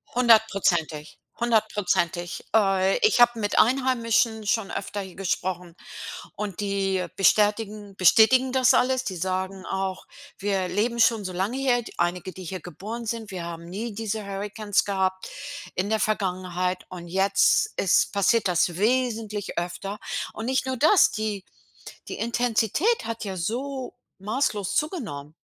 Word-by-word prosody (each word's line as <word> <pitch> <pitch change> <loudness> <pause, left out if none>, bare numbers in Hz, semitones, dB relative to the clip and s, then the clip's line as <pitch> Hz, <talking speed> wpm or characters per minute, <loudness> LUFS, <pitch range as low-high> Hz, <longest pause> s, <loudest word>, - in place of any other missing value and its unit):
100%, 195 -10 +2 0.2
100%. 205 -7 0
Äh, 195 -2 +3
ich 430 - +3
habe 240 -1 +5
mit 205 -1 -1
Einheimischen 230 -3 +2
schon 205 -1 0
öfter 200 +1 -4
hier 190 -2 -10
gesprochen, 180 -2 -3 0.6
und 205 -3 -5
die 195 -2 0
bestätigen 210 0 +1
bestätigen 245 +7 +5
das 260 -1 +4
alles. 260 0 +2
Die 185 - -3
sagen 185 +1 -3
auch: 190 -1 -3 0.3
„Wir 195 -2 -1
leben 235 +5 -1
schon 225 -3 +3
so 185 - -4
lange 200 +8 -1
her.” 245 -3 +1
Einige, 180 +2 -1
die 185 - -9
hier 185 0 -6
geboren 215 +8 -7
sind: 225 -2 -4
„Wir 180 -2 -5
haben 170 0 -7
nie 210 +5 -5
diese 220 -1 -4
Hurrikans 205 +1 -1
gehabt 190 -1 -1 0.5
in 190 +3 -1
der 220 0 +1
Vergangenheit 185 -3 -1
und 175 -2 -8
jetzt 195 - +2
ist 185 - +3
passiert 200 +2 +3
das 175 -1 +1
wesentlich 220 -2 -1
öfter.” 195 +4 -4 0.3
Und 220 - -6
nicht 260 0 0
nur 260 0 -2
das, 315 - +5
die 215 -3 -3 0.6
die - - -5
Intensität 240 - +1
hat 230 0 -4
ja 190 -1 -4
so 255 +8 -3 0.3
maßlos 210 -2 -1
zugenommen. 205 - -3
205 Hz, 140 wpm, -25 LUFS, 185-230 Hz, 0.6 s, habe